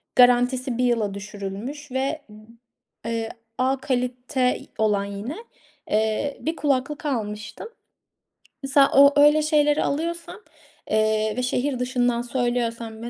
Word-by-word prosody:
garantisi 250 0 +4
1 250 - +1
yıla 225 -5 +1
düşürülmüş 205 +8 -7
ve, 270 +4 -1 0.8
eee, 230 -1 -2 0.3
A 260 +1 +1
kalite 250 0 -1 0.2
olan 210 -2 +1
yine, 200 +8 -6 0.6
eee, 220 +6 0
bir 320 +2 -2
kulaklık 290 0 -1
almıştım. 215 - -4 0.9
Mesela 275 0 +4
o, 280 +1 +7
öyle 295 +1 +6
şeyleri 300 -1 +2
alıyorsam, 335 +5 -3 0.5
eee, 215 0 +2
ve 250 - 0
şehir 255 +1 -1
dışından 245 -1 0
söylüyorsam 235 -2 -2
250 Hz, 110 wpm, -24 LUFS, 225-280 Hz, 0.9 s, o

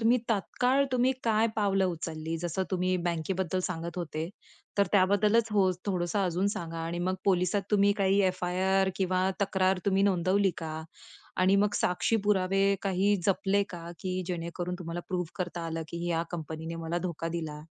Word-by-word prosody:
तुम्ही 235 +2 +4
तात्काळ 250 +5 +2
तुम्ही 255 +1 +3
काय 225 -1 +3
पावलं 195 -2 +2
उचलली? 160 -2 -3
जसं 175 +2 -2
तुम्ही 185 0 +1
बँकेबद्दल 175 +2 -1
सांगत 170 -1 -5
होते, 160 -2 -3 0.5
तर 200 - +5
त्याबद्दलच 205 +3 +4
हो, 195 -3 +4 0.2
थोडंसं 180 0 0
अजून 180 +2 0
सांगा 165 -1 -5
आणि 170 +1 -3
मग 185 +2 0
पोलिसात 190 +1 +2
तुम्ही 205 -1 +4
काही 195 +1 +4
एफ-आय-आर 185 +1 +1
किंवा 185 0 +1
तक्रार 190 -1 +2
तुम्ही 195 0 +3
नोंदवली 195 +1 +3
का? 160 -1 -5 0.5
आणि 190 +2 +4
मग 205 - 0
साक्षी 180 +5 +1
पुरावे 195 0 +3
काही 195 +1 +2
जपले 200 +1 +2
का 170 -1 -7
की 185 0 -2
जेणेकरून 175 +1 -3
तुम्हाला 170 -1 -5
प्रूव्ह 180 -1 -1
करता 175 -2 -3
आलं 165 0 -3
की 170 +1 -4
या 165 -1 +1
कंपनीने 160 -1 -5
मला 165 +2 -1
धोका 170 -2 -3
दिला? 160 -3 -4
185 Hz, 160 wpm, -29 LUFS, 170-195 Hz, 0.5 s, तर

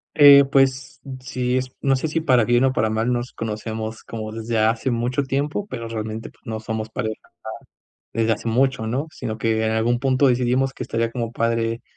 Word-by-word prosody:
Eh, 140 -2 +9
pues 135 0 +1 0.2
sí, 125 0 -1
es 130 0 -3
no 135 -1 +3
sé 145 +5 -2
es - - -6
si 165 - +2
para 125 -7 +4
bien 120 +3 +3
o 130 - +2
para 110 -3 +1
mal 110 +3 0
nos 120 +1 -3
conocemos 110 0 -5
como 110 -1 -6
desde 115 +1 -3
hace 115 +4 +1
mucho 120 +4 0
tiempo, 145 +9 -2
pero 115 0 -5
realmente 110 0 -5
pues - - -30
no 110 -1 -4
somos 110 0 -4
pareja 110 -1 -3
ya - - -24 0.9
desde 110 0 +3
hace 115 - -6
mucho, 125 -1 +1
¿no? 135 +8 -2
Sino 110 -3 -5
que 110 0 0
en 110 - +1
algún 115 +2 +1
punto 135 +1 +3
decidimos 130 +2 +1
que - - -6
estaría 115 0 -1
como 115 -2 -3
padre 115 0 -1
120 Hz, 205 wpm, -22 LUFS, 110-130 Hz, 0.9 s, Eh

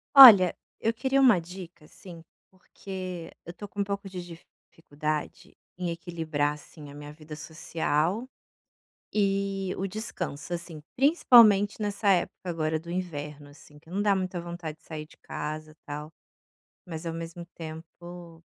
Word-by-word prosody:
Olha, 210 -10 +11 0.2
eu 225 - +1
queria 265 +3 +2
uma 245 -9 +6
dica, 170 -2 -10
assim, 170 0 -12 0.3
porque 185 -2 -7
eu 170 - -7
tô 205 - -8
com 200 +1 -4
um - - +3
pouco 200 0 -4
de 180 -2 -6
dificuldade 155 -3 -6 0.2
em 180 -2 -2
equilibrar, 160 -4 -1
assim, 150 0 -12
a 140 - -11
minha 145 0 -9
vida 155 0 -10
social 160 +6 -1 0.9
e 195 -2 0
o 195 - -2
descanso, 180 -6 -5
assim, 170 -3 -6
principalmente, 235 - +6
nessa 205 0 -1
época 190 -3 +2
agora 160 -1 0
do 170 +1 -10
inverno, 150 -5 -5
assim, 150 +1 -17
que 160 +2 -19
não 195 +3 -1
dá 205 -1 +4
muita 185 -1 -2
vontade 170 -2 -6
de - - -28
sair 155 -1 -7
de - - -19
casa 155 +1 -6
tal, 150 +1 -6 0.8
mas 165 -1 -7
ao 165 - -2
mesmo 165 +1 -6
tempo 165 +1 -10
170 Hz, 150 wpm, -28 LUFS, 155-195 Hz, 0.9 s, Olha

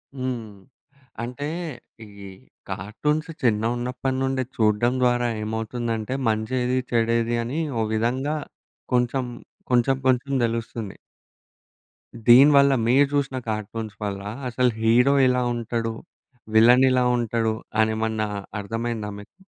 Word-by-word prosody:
హ్మ్. 130 -3 -3 0.8
అంటే 125 +4 -5 0.6
ఈ - - -14 0.6
కార్టూన్స్ 150 - -2
చిన్నగా 115 -2 +2
ఉన్నప్పటి 125 +2 -2
నుండె 130 -1 0
చూడడం 110 +3 +2
ద్వారా 120 -1 +2 0.2
ఏమవుతుందంటే 115 +2 -3
మంచి 110 +3 -2
ఏది, 125 +1 0
చెడు 115 -1 +2
ఏది 115 +1 -1
అని 130 +7 -3 0.2
ఓ - - +2
విధంగా 130 +7 0 0.6
కొంచెం 125 +1 +1 0.5
కొంచెం 125 +2 +3
కొంచెం 130 +2 +1
తెలుస్తుంది. 115 -2 -4 1.3
దీని 130 +5 +8
వల్ల 140 0 +5
మీరు 135 +4 +5
జూసిన 135 -2 0
కార్టూన్స్ 110 0 -4
వల్ల 100 -1 -3 0.3
అసలు 125 +1 +2
హీరో 120 +5 +4
ఎలా 125 0 +2
ఉంటాడు, 115 -1 -2 0.6
విలన్ 125 +4 +7
ఇలా 125 -1 +2
ఉంటాడు 115 -1 0 0.3
అని 110 0 +2
ఏమన్నా 110 -1 -1 0.3
అర్థమయిందా 115 0 -3
మీకు? 105 - -15
120 Hz, 115 wpm, -24 LUFS, 110-130 Hz, 1.3 s, దీని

